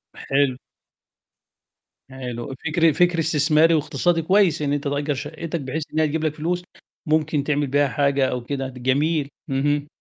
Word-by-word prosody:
حلو. 135 -2 0 1.5
حلو. 125 -1 -6
فكر 165 0 +3
فكر 175 +2 +2
استثماري 160 +1 +3
واقتصادي 160 +3 +1
كويس، 185 -1 +3
إن 145 -1 0
أنت 145 - -2
تأجّر 145 +1 -1
شَقتَك 155 +3 -5
بحيث 140 +4 -3
إن 155 - 0
هي 155 - +3
تجيب 155 +2 -2
لك 155 -1 -1
فلوس، 175 +3 -2 0.4
ممكن 155 -1 +1
تعمل 145 0 0
بيها 145 +1 +2
حاجة 140 +2 +1
أو 125 -1 -3
كده، 135 +1 -3
د 125 -1 -10
جميل. 145 +3 +1 0.2
اهم. 145 +2 0
145 Hz, 155 wpm, -22 LUFS, 140-160 Hz, 1.5 s, فكر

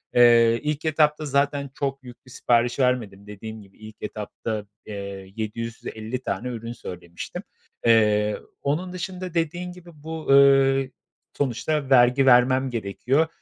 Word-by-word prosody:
Eee, 115 -1 +6
ilk 150 +1 -2
etapta 155 -1 +2
zaten 140 0 0
çok 135 -1 -2
büyük 125 0 -13
bir 125 - -15
sipariş 120 +1 +1
vermedim. 115 -6 0
Dediğim 110 +1 -8
gibi 100 -1 -19
ilk 110 0 -12
etapta, 105 0 -5 0.2
eee, 100 -2 -7
750 115 +2 -5
tane 125 -1 -3
ürün 115 -1 -5
söylemiştim. 85 -5 -8 0.4
Eee, 105 -2 +4 0.2
onun 170 +6 -2
dışında 180 0 -5
dediğin 175 +2 -2
gibi 180 -1 -13
bu, 160 0 -6
eee, 135 -1 +5 0.5
sonuçta 145 +2 -1
vergi 125 +1 +5
vermem 130 +1 +5
gerekiyor, 125 +7 0
125 Hz, 130 wpm, -24 LUFS, 110-145 Hz, 0.5 s, Eee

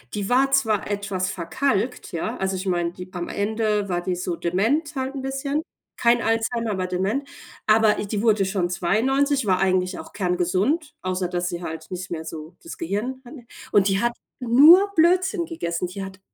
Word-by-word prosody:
Die 205 -1 -2
war 265 +3 +3
zwar 220 -8 +1
etwas 200 -3 -2
verkalkt, 245 +6 -1
ja, 165 - -3
also 190 0 -1
ich 185 +1 -4
meine, 175 -2 0
die 180 0 -9
am 175 -1 -4
Ende 210 0 0
war 175 -1 -1
die 180 +1 -2
so 175 -1 -3
dement 240 - 0
halt 265 0 -3
'n 275 - -5
bisschen, 275 +3 -2 0.4
kein 235 0 +3
Alzheimer, 225 0 0
aber 185 -2 -2
dement. 200 +10 -1 0.4
Aber 220 0 +4
i 205 - -3
die 205 +1 -2
wurde 215 -3 +3
schon 190 -2 -1
92, 265 +9 +1
war 185 -2 +2
eigentlich 185 -1 +1
auch - - -10
kerngesund, 190 - 0
außer 185 0 -1
dass 175 0 -2
sie 175 0 -5
halt 160 0 -7
nicht 185 +1 -5
mehr 160 -1 -5
so 160 +1 -8
das 335 - -9
Gehirn 260 -2 -3
hatte. 245 -1 -12 0.3
Und 200 -1 +4
die 195 0 +1
hat 240 0 +1 0.3
nur 300 - +7
Blödsinn 355 +2 +3
gegessen. 175 - -3
Die 190 +2 -6
hat 190 0 -9
205 Hz, 185 wpm, -23 LUFS, 185-265 Hz, 0.4 s, nur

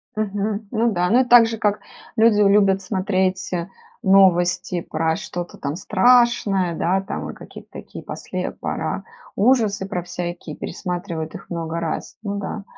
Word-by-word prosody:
Мгм, 210 0 -2
ну 230 0 +1
да. 180 -2 0
Ну, 240 - +5
это 255 -1 +1
так 240 -1 +8
же, 225 0 -4
как 210 -1 +1 0.4
люди 220 -2 +4
любят 195 -1 +4
смотреть, 185 -1 -1
э, 170 -1 -2 0.3
новости 185 -2 +3
про 160 0 -1
что-то 175 0 -6
там 140 +1 -4
страшное, 205 -2 +3
да, 185 +4 +1
там 195 - -5
во - - -6
какие-то - - -12
такие - - -9
после - - -5
пора - - -3 0.3
ужасы 215 -3 +2
про 180 -3 -3
всякие 175 -3 -6
пересматривают 175 -3 -5
их - - -10
много 165 -1 -3
раз, 160 -2 -4
ну 200 -1 -3
да. 205 +1 -5
195 Hz, 155 wpm, -21 LUFS, 175-215 Hz, 0.4 s, так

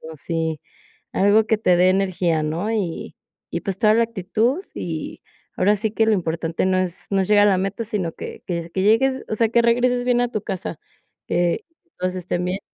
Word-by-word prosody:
sí, 160 0 -2 0.5
algo 205 +3 +4
que 220 - +2
te 185 -4 +3
dé 180 +1 +5
energía, 185 -4 +1
¿no?, 165 +7 -2
y 195 -7 -3 0.4
y - - -2
pues 195 -3 -3
toda 215 -1 +5
la 230 - +4
actitud, 230 - -1
y 160 -3 -5 0.4
ahora 205 +3 +4
sí 215 +1 -1
que 225 +1 +2
lo 220 - +4
importante 165 -2 -1
no 185 0 +2
es 180 -2 -3
no 195 - +3
es 190 - -1
llegar 205 0 +6
a - - +5
la 190 - +2
meta, 195 +5 -2
sino 200 -6 -2
que - - -8
que 175 - -1
s 170 0 -8
que 190 - -1
llegues 260 +6 +3
o 215 - -1
sea, 230 +1 +3
que 235 0 +4
regreses 245 +1 +2
bien 245 -1 +3
a 245 - +2
tu 215 -3 -3
casa, 185 -5 -5 0.5
que 175 -1 0 0.3
todos 185 0 -1
estén 180 -1 -2
bien. 185 +2 -2
195 Hz, 210 wpm, -22 LUFS, 175-220 Hz, 0.5 s, llegar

